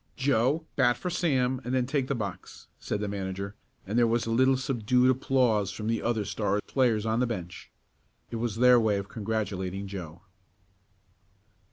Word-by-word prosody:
"Joe, 135 +4 +1
bat 120 0 +3
for 180 - -4
Sam 130 -7 +1
and 125 +2 -2
then 125 -1 +2
take 135 0 -1
the 140 - -1
box," 100 -6 -6
said 105 - -3
the 105 - -2
manager, 100 0 -4 0.3
and 105 +5 0
there 120 - +5
was 115 +1 +1
a 115 - -2
little 130 +3 +4
subdued 125 -1 +2
applause 125 -6 +1
from 105 - -6
the 115 -1 0
other 110 -3 0
Star 105 -1 -1
players 115 -5 +1
on 110 +1 +1
the 125 - +2
bench. 90 -7 -6 0.6
It 115 - -3
was 115 -2 -2
their 125 +1 +6
way 110 -3 +2
of 100 0 -5
congratulating 100 -3 -3
Joe. 90 -3 -8
115 Hz, 175 wpm, -28 LUFS, 100-125 Hz, 0.6 s, their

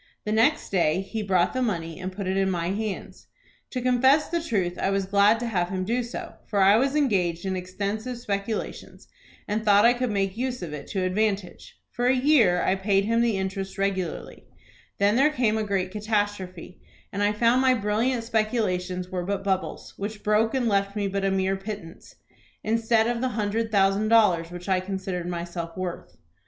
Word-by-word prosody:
The 210 - -2
next 225 +8 +2
day 175 -2 +2
he 220 +3 -5
brought 185 -4 +1
the 255 - -1
money, 165 -9 -2
and 185 0 -4
put 195 +1 -6
it 190 +1 -1
in 195 0 +2
my 175 -2 -1
hands. 210 0 -5 0.4
To 250 -2 -4
confess 260 +4 +4
the 340 0 -1
truth 190 - -1
I - - +1
was 195 -1 0
glad 200 +3 +4
to - - -2
have 180 -6 -1
him 185 0 -2
do 235 +5 0
so, 235 0 -7
for 205 - -1
I 195 +2 +6
was 270 +5 +2
engaged 190 - +1
in 190 -1 -1
extensive 200 +6 -4
speculations, 210 -2 -4 0.4
and 210 +1 -1
thought 205 0 +5
I 240 - +6
could 250 0 -2
make 195 -2 -1
use 250 -3 -3
of 160 -3 -6
it 145 -2 -7
to 190 -2 -2
advantage. 195 -1 -2
For 245 +1 -1
a 260 - +4
year 250 -10 +4
I - - +2
paid 195 0 +1
him 230 +2 +2
the 230 -4 +1
interest 190 0 -4
regularly. 195 -3 -3 0.5
Then 205 +3 +3
there 280 +3 +5
came 240 -7 +1
a - - 0
great 195 -3 -1
catastrophe, 205 -4 -3 0.3
and 200 - -2
I 205 0 +3
found 235 +4 +3
my 260 -1 +4
brilliant 225 +3 0
speculations 200 -6 -1
were 180 -2 -3
but 200 +2 -2
bubbles, 190 -1 -2
which 205 +1 -5
broke 215 +3 +2
and 250 -3 +1
left 200 -1 +1
me 205 -1 -1
but 195 0 -2
a - - +2
mere 190 0 0
pittance, 195 -4 -9 0.5
instead 225 0 +2
of 235 0 -1
the 260 - 0
hundred 220 +2 -1
thousand 195 +1 +3
dollars 200 -7 +4
which 175 +1 -9
I 190 -1 +2
considered 185 -2 -4
myself 170 -1 -5
worth. 175 - -6
200 Hz, 195 wpm, -25 LUFS, 185-225 Hz, 0.5 s, I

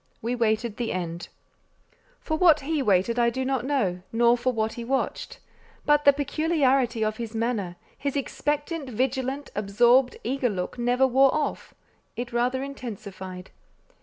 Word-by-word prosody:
We 235 +2 -2
waited 225 -2 0
the 240 -2 -2
end. 170 -1 -4 0.9
For 315 - -2
what 315 -3 +5
he 300 +1 -1
waited, 210 +1 +2
I 235 0 +4
do 260 +2 -3
not 260 -2 -1
know, 205 -11 0
nor 235 +1 +4
for 245 +1 0
what 220 -2 -1
he 235 - -6
watched; 270 - -2 0.5
but 295 0 +3
the 285 - +9
peculiarity 275 -5 +1
of 215 0 -2
his 230 -1 -6
manner, 220 -6 -1 0.2
his 280 0 -2
expectant, 295 +1 -2
vigilant, 265 +3 -2
absorbed, 240 +6 +3
eager 255 +1 0
look, 190 +3 -4
never 245 +2 +3
wore 265 +1 +4
off: 305 -2 -3 0.4
it 240 0 -5
rather 250 +2 0
intensified. 200 -9 -8
245 Hz, 150 wpm, -26 LUFS, 220-275 Hz, 0.9 s, the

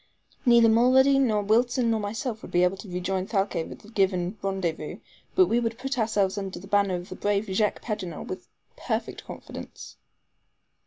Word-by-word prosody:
Neither 235 -1 +7
Mulrady, 260 +4 +5
nor 215 -6 +2
Wilson, 235 +3 +2
nor 225 - +1
myself 220 +2 -3
would - - -9
be 175 - +3
able 180 +2 +2
to 200 0 -10
rejoin 185 +1 -2
Thalcave 195 -6 -1
at - - -9
the - - -16
given 190 -2 +1
rendezvous, 190 -4 -2 0.4
but 370 - +6
we 235 -7 +2
will 235 -1 +1
put 260 +3 -4
ourselves 205 -3 +1
under 195 -1 -5
the 185 - -10
banner 200 -2 +2
of 175 +1 -6
the - - -6
brave 205 0 0
Jacques 210 +1 0
Paganel 190 -8 -4
with - - -7 0.3
perfect - - -3
confidence." - - -9
205 Hz, 175 wpm, -26 LUFS, 190-230 Hz, 0.4 s, Neither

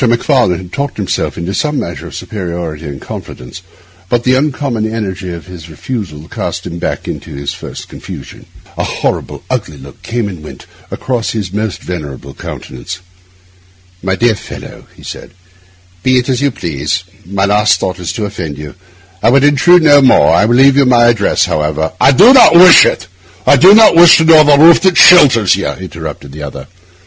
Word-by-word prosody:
Macfarlane 120 - +1
had 90 -1 -12
talked 140 0 -4
himself 100 -4 -3
into 85 +3 -5
some 150 +5 -2
measure 85 - -7
of - - -11
superiority 85 -5 -7
and 70 -1 -8
confidence, 60 +8 -10 0.5
but 120 -1 0
the 125 - +1
uncommon 130 -6 -2
energy 95 -5 -5
of 85 -1 -9
this 85 -3 -12
refusal 80 - -7
cast 85 0 -6
him 85 0 -7
back - - -5
into - - -7
his 70 0 -5
first - - -10
confusion. - - -11 0.3
A - - -1
horrible, - - -4
ugly 75 - -4
look 70 +1 -15
came 115 -2 -4
and 90 -6 -9
went - - -12 0.2
across 120 -3 -4
his 100 -5 -5
almost 105 -1 -4
venerable 70 -6 -8
countenance. 80 +9 -9 1.0
'My 95 0 -2
dear 115 +2 +1
fellow,' 100 - -11
he - - -18
said, - - -10 0.7
'be 130 +4 +1
it 125 +1 -1
as 130 0 -1
you 140 - +1
please; 85 - -4 0.2
my 100 +2 -2
last 105 +1 +1
thought 90 -1 -4
is 90 - -5
to 105 - -4
offend 90 -8 -7
you. 75 0 -9 0.5
I 115 - +2
would 135 +3 +3
intrude 160 +4 +3
on 145 -3 +5
none. - - +4
I 105 - +3
will 120 +2 +1
leave 135 +2 +4
you 140 - +4
my 120 -1 +4
address, 110 -4 0
however—' 75 +1 -3
'I 135 - +5
do 240 - +6
not 250 -10 +6
wish 180 0 +7
it—I 90 +6 -2
do 185 +9 +6
not 220 -5 +5
wish 170 0 +7
to 160 - +1
know 160 -1 +6
the 145 -1 +4
roof 165 +3 +6
that 190 -1 +1
shelters 130 - +5
you,' 100 - -4
interrupted 80 -3 -8
the 75 +2 -10
other. 70 -1 -8
100 Hz, 185 wpm, -12 LUFS, 85-135 Hz, 1.0 s, wish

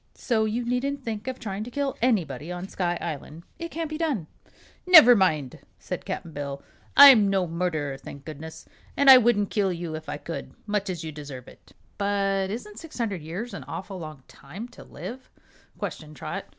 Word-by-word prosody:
So 220 -3 0
you 230 +3 -2
needn't 270 +3 -1
think 220 0 -5
of 260 -1 -3
trying 205 -4 -4
to 235 - -7
kill 275 +1 -2
anybody 170 - 0
on 180 +1 -5
Sky 175 -3 -1
Island. 160 0 -6 0.2
It 335 0 -5
can't 330 0 -3
be 310 +1 -6
done." 285 - -1 0.6
"Never 310 -9 +10
mind," 155 - +1 0.2
said - - -6
Cap'n 165 - -5
Bill. 140 -2 -5 0.3
"I'm 260 -8 +10
no 190 -2 +2
murderer, 160 -5 -2
thank 140 +1 -11
goodness, 160 +1 -9 0.3
and 280 -1 +8
I 260 - +11
wouldn't 215 -4 +2
kill 200 -3 +1
you 170 -2 -5
if 155 -1 -7
I 145 - -3
could 165 +2 -7
much 205 -2 -1
as 175 -3 -4
you 160 - -5
deserve 145 -4 -9
it." - - -17 0.3
"But 195 -1 0
isn't 210 0 -6
six 325 +1 -11
hundred 205 -8 -2
years 180 +10 -6
an - - -6
awful 190 0 -6
long 155 -5 -9
time 195 - -9
to 245 - -13
live?" 220 - -9 0.5
questioned 155 -1 -6
Trot. - - -5
195 Hz, 190 wpm, -26 LUFS, 160-240 Hz, 0.6 s, I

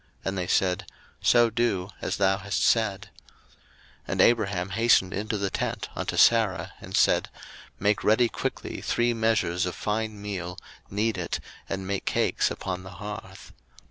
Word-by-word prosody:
And 95 - -1
they 90 -2 -2
said, 90 -1 +1 0.3
So 120 -1 +5
do, 100 -5 0
as - - -2
thou 95 0 +2
hast 100 0 -1
said. 100 -5 +1 0.4
01:018:006 - - -29 0.5
And - - +1
Abraham 100 -6 +2
hastened 110 -3 +3
into 105 +2 -2
the 100 -1 -2
tent - - -3
unto - - -3
Sarah, 115 -5 +4
and - - -3
said, - - +3 0.5
Make 105 +1 +1
ready 110 +3 +4
quickly - - -4
three 120 0 +1
measures 110 -6 +1
of 90 - -4
fine 110 0 -2
meal, 90 -3 -5 0.3
knead 105 0 0
it, 85 - -2 0.3
and 95 -1 -3
make 100 0 -3
cakes - - +1
upon 95 -1 -4
the 95 0 -10
hearth. 105 +2 -8
100 Hz, 155 wpm, -26 LUFS, 95-110 Hz, 0.5 s, So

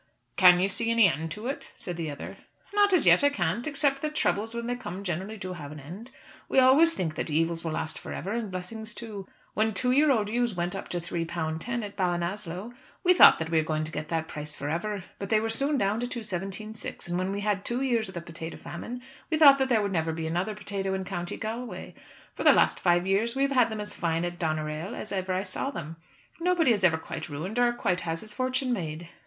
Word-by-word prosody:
"Can 180 -2 +7
you 190 - +3
see 230 +4 -1
any 230 -3 +6
end 160 -1 -2
to 210 +2 -8
it?" 270 +3 -4
said 175 - -5
the 165 -2 -3
other. 145 - -7 0.4
"Not 410 -1 +4
as 365 - +4
yet - - +6
I 285 - +6
can't, 190 - -1
except 280 -2 +1
that 305 0 -3
troubles 225 -4 0
when 235 0 -3
they 245 - -1
come 195 -5 -6
generally 190 +4 -3
do 185 -2 -5
have 150 -4 -8
an 150 - -8
end. 180 - -9 0.4
We - - 0
always 275 +6 +6
think 165 -4 -2
that - - -3
evils 165 +2 0
will 165 -2 -2
last 160 0 -3
for - - -8
ever, 195 - -4
and 230 -2 -2
blessings 210 +4 -5
too. 210 -5 -7 0.3
When 220 0 +1
two 250 +5 +1
year 290 +4 +5
old 220 -6 +3
ewes 240 -1 0
went 175 +1 -2
up 195 - -6
to 175 - -2
three 170 0 -3
pound 160 -1 -3
ten 240 -1 -2
at 205 -1 -7
Ballinasloe, 180 +3 -2 0.3
we 365 -1 +6
thought - - +9
that 160 0 -4
we 160 -1 +4
were 155 0 -1
to 155 - -4
get 155 0 -5
that 160 -1 -1
price 150 0 -6
for 145 +1 -4
ever, 200 +4 -2 0.2
but 200 - -5
they 220 - +4
were 225 +1 -2
soon 275 +5 +2
down 200 -1 +1
to 245 - -2
two 240 -2 -5
seventeen 195 +2 -4
six; 220 - -6
and 175 +1 -1
when 185 +1 -1
we 200 +1 -3
had 205 -1 +1
had 195 - -16
two 245 +3 -1
years 235 -4 +1
of 190 - -9
the 170 - -3
potato 165 -1 -7
famine, 245 +8 -7 0.3
we 315 - +1
thought 280 -3 +8
that 265 0 +1
there 225 -4 +3
would 200 - -1
never 160 -3 0
be 160 0 -4
another 175 +6 -1
potato 195 -2 -3
in 190 0 -3
County 175 -2 -4
Galway. 230 +2 -5 0.4
For - - -5
the - - +8
last - - +3
five 175 0 +3
years 210 +5 +1
we've 275 +1 +1
had 250 -4 +4
them 220 -1 -4
as 210 0 -7
fine 165 -1 0
at 175 0 -5
Doneraile 155 +3 -2
as 215 - -6
ever 190 -1 -2
I 185 +1 0
saw 200 +7 -3
them. 165 - -6 0.4
Nobody 345 -5 +3
is 205 -4 +1
ever 165 -4 +5
quite 160 +1 -7
ruined, 175 +11 -4
or 245 0 +4
quite 185 -6 0
has 165 -1 -3
his 215 -1 -8
fortune 255 +1 0
made." 165 -5 -4
195 Hz, 250 wpm, -28 LUFS, 170-235 Hz, 0.4 s, thought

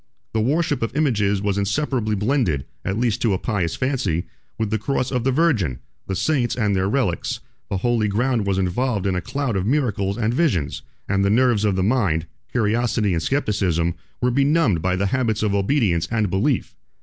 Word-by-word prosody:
The 110 - +1
worship 145 +3 +1
of 115 +3 -2
images 105 -9 +1
was 100 -1 0
inseparably 110 +1 0
blended, 105 - 0 0.2
at 100 - -2
least 120 -2 0
to 110 -4 +2
a - - +1
pious 95 -6 -1
fancy, 110 - -1 0.3
with 110 -2 -2
the 110 - +1
Cross, 130 +2 -1
the 125 0 +1
Virgin, 125 - +1 0.3
the 95 - -2
Saints 125 - +1
and 105 -5 +1
their 95 +1 +1
relics; 110 -8 -1 0.3
the 95 - -1
holy 115 +1 +1
ground 115 +1 0
was 95 -1 +1
involved 100 +3 0
in 95 - +1
a 90 - -1
cloud 135 -2 -2
of 95 +1 -1
miracles 105 -8 0
and 115 0 0
visions; 115 - 0 0.3
and 100 0 +1
the 100 - +3
nerves 115 -1 +3
of 100 -2 +2
the 95 - +1
mind, 100 -8 +1 0.3
curiosity 115 -2 +1
and 85 - 0
scepticism, 95 - 0 0.3
were 125 - +3
benumbed 140 - +2
by 90 +2 +1
the 95 +2 0
habits 115 -5 +1
of 105 -2 +1
obedience 100 - +1
and 110 -5 0
belief. 125 +7 0
110 Hz, 185 wpm, -22 LUFS, 95-125 Hz, 0.3 s, the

